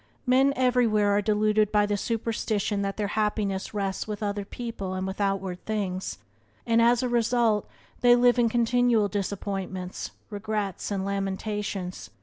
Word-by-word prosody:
Men 265 +2 +4
everywhere 240 -5 +3
are 205 - +3
deluded 215 0 +2
by 210 -1 +4
the 205 0 0
superstition 215 -2 -1
that 195 0 -2
their 205 -2 -1
happiness 210 -2 -1
rests 195 -2 -2
with 210 0 -4
other 205 0 -2
people 200 -3 -5
and 185 0 -2
with 190 +2 -4
outward 195 -2 -1
things, 195 -4 -2 0.5
and, 230 0 +3
as 235 +1 +4
a - - +1
result, 235 -3 +2 0.3
they 245 -1 +6
live 245 0 +4
in 235 -1 +4
continual 235 -2 +3
disappointments, 195 -2 -4 0.2
regrets, 205 -2 -3
and 195 -2 -2
lamentations. 195 -1 -3
210 Hz, 145 wpm, -26 LUFS, 195-230 Hz, 0.5 s, they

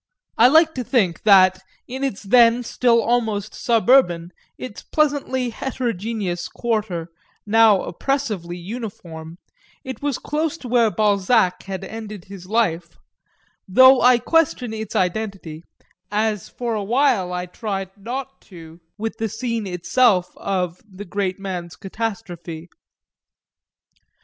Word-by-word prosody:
I 235 - +6
like 320 +4 +5
to 255 - -4
think 215 -9 +1
that, 185 -3 +6 0.3
in 260 +2 -5
its 260 -8 -3
then 235 +3 +5
still 235 0 +2
almost 220 -3 -1
suburban, 225 -8 +2 0.3
its 250 -5 -8
pleasantly 280 -5 0
heterogeneous 220 -7 -3
quarter, 210 -8 -3 0.4
now 215 -2 +5
oppressively 210 -8 -3
uniform, 175 -5 -8 0.5
it 260 0 -7
was 285 -3 -1
close 310 +2 -2
to 255 - -9
where 235 -2 +3
Balzac 205 -2 +2
had 195 0 -5
ended 215 -3 -8
his 190 -2 -11
life, 180 -6 -1 0.7
though 260 +7 +7
I 250 0 +6
question 250 -3 +1
its 220 -2 -6
identity 180 -4 -2 0.5
as 210 -2 -1
for 240 -2 -4
a 210 -2 -2
while 235 -4 +2
I 180 0 -3
tried 195 0 -5
not 255 +6 -6
to 165 -3 -12 0.2
with 225 +1 -4
the 225 0 -1
scene 230 -1 -3
itself 185 +2 +2
of 180 -3 -3
the 195 +2 -9
great 190 0 -2
man's 180 -5 -6
catastrophe. 180 -5 -6
215 Hz, 125 wpm, -21 LUFS, 185-245 Hz, 0.7 s, though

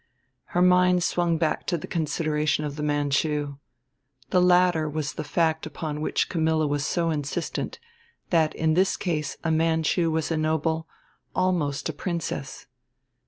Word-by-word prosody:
Her 180 - +5
mind 180 0 +4
swung 170 -1 +1
back 160 -1 -1
to 175 - +1
the 150 - -7
consideration 155 -2 0
of 145 -1 -4
the 150 - -5
Manchu: 145 0 0 0.7
The 180 - +4
latter 180 -3 +4
was 150 -2 -3
the - - -4
fact 160 +1 0
upon 150 0 -5
which - - 0
Camilla 160 -2 +1
was 145 -1 0
so 165 +1 0
insistent, 150 +2 -3 0.5
that 160 -3 +3
in 160 0 +1
this 185 +3 +2
case 155 -6 -2
a 160 - +1
Manchu 160 +1 +2
was 160 0 -1
a 165 - +1
noble, 160 +1 0 0.5
almost 170 -6 0
a 160 - -3
princess. 160 -4 -4
160 Hz, 150 wpm, -25 LUFS, 150-170 Hz, 0.7 s, Her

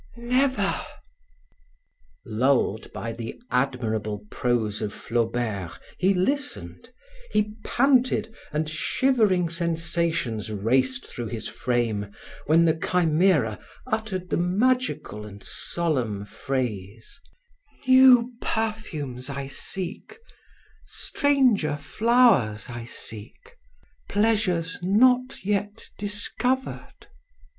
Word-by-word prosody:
"Never!" 255 +3 +1 1.4
Lulled 120 -2 +1
by 115 0 -5
the 115 0 -7
admirable 110 -5 -1
prose 115 -4 0
of 105 -2 -2
Flaubert, 115 -6 -2 0.2
he 190 +1 +3
listened; 280 +10 -2 0.4
he 210 0 +1
panted 255 -3 +2 0.2
and 155 +1 -1
shivering 190 - +2
sensations 165 - -1
raced 130 +5 +1
through 120 -2 -6
his 110 0 -5
frame, 115 -5 -1 0.4
when 165 +3 +5
the 160 - +4
Chimera 160 - +2 0.3
uttered 220 -6 -3
the - - +2
magical 200 - 0
and 100 -1 -11
solemn 125 -12 -2
phrase: 115 - -4 0.7
"New 255 -2 +7
perfumes 155 - -3
I 140 0 -4
seek, 185 - -5 0.7
stranger 250 - +1
flowers 145 - +3
I 120 -1 -6
seek, 120 - -10 0.5
pleasures 205 -6 +1
not 250 +6 +3
yet 205 +1 -2
discovered." 210 +6 -2
165 Hz, 85 wpm, -25 LUFS, -, 1.4 s, New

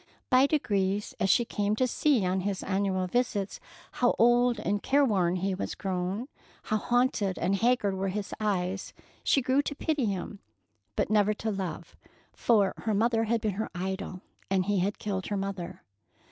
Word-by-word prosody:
By 260 +2 +6
degrees, 205 -9 0
as 195 - +1
she 240 - +4
came 205 -1 0
to 255 - +2
see 255 -3 +2
on 185 +1 +1
his 195 0 -2
annual 190 -1 0
visits 205 -1 -1 0.3
how 245 - +2
old 240 0 +4
and 205 -1 -1
careworn 210 -11 +2
he 190 +2 -1
was 185 - -4
grown, 190 +5 -2 0.4
how 215 - 0
haunted 230 -5 +1
and 195 - +1
haggard 230 -3 +2
were 190 +1 -2
his 195 +1 -3
eyes, 190 -3 -1 0.3
she 275 - +3
grew 260 +3 +3
to 290 - -4
pity 295 -3 0
him, 200 0 -3 0.6
but - - 0
never 210 0 +3
to 220 +1 -2
love, 180 -4 -5 0.4
for 205 -5 +3
her 220 -2 -1
mother 225 +1 +2
had 230 0 0
been 215 -2 0
her 215 +3 -3
idol, 190 0 -4 0.3
and 190 -1 +2
he 205 -1 +1
had 200 +3 0
killed 195 -3 -3
her 205 - -1
mother. 195 -3 -5
205 Hz, 175 wpm, -28 LUFS, 190-235 Hz, 0.6 s, By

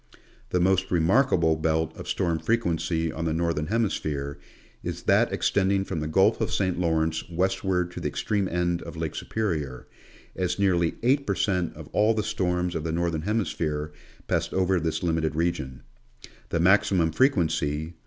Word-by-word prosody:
The 90 - +1
most 95 +1 +2
remarkable 85 -1 +3
belt 80 0 0
of - - -9
storm 85 -3 0
frequency 85 -7 0
on 80 +2 -4
the 80 -1 0
Northern 80 -2 -1
Hemi 110 +2 +1
sphere 70 -1 -3 0.4
is - - -5
that - - +3
extending 95 0 +1
from 80 - -3
the 75 - -3
Gulf 80 - +3
of - - 0
Saint 95 -3 0
Lawrence 80 -2 0
west 95 +3 0
ward 90 -2 0
to - - -7
the - - -2
extreme 100 -3 -1
end 85 0 0
of - - -9
Lake 80 -2 -3
Superior, 80 -12 -3 0.5
as 90 -1 -1
nearly 90 -4 +2
8 140 +3 +2
per 100 - +1
cent, 90 -4 0
of - - -10
all 110 +2 +3
the 105 - 0
storms 90 -3 -1
of 80 - -3
the 80 - -2
Northern 85 -1 -1
Hemisphere 80 -7 -2 0.4
passed - - -1
over 95 -1 +2
this 80 +1 -2
limited 80 -2 0
region; 75 -6 -2 0.7
the 85 - 0
maximum 90 -2 +3
frequency 80 - +1
(1. 85 - -11
85 Hz, 175 wpm, -26 LUFS, 80-95 Hz, 0.7 s, remarkable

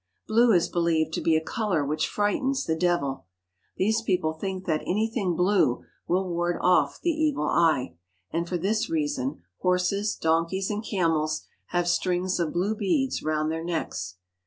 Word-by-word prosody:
Blue 230 +2 +4
is 175 -5 +4
believed 165 -2 +1
to - - -1
be 165 - +3
a 160 - -2
colour 200 - -1
which 155 +2 0
frightens 260 +7 0
the 160 - 0
devil. 160 -6 0 0.5
These 220 +4 +2
people 180 -7 0
think 185 +3 -5
that 155 -2 0
anything 210 -2 0
blue 180 -8 +2 0.2
will 185 +2 +1
ward 175 0 -1
off 180 0 +3
the 345 - +1
evil 305 - 0
eye, 155 - +2 0.4
and 170 +1 -2
for 180 - 0
this 210 +6 0
reason 145 - -2 0.2
horses, 180 +3 +1
donkeys, 165 +5 0
and 210 +1 -3
camels 160 -6 0 0.2
have 175 0 0
strings 180 +1 0
of 165 -3 0
blue 190 +5 0
beads 255 +7 0
round 155 0 0
their 160 0 -3
necks. 95 - -3
175 Hz, 160 wpm, -26 LUFS, 160-200 Hz, 0.5 s, Blue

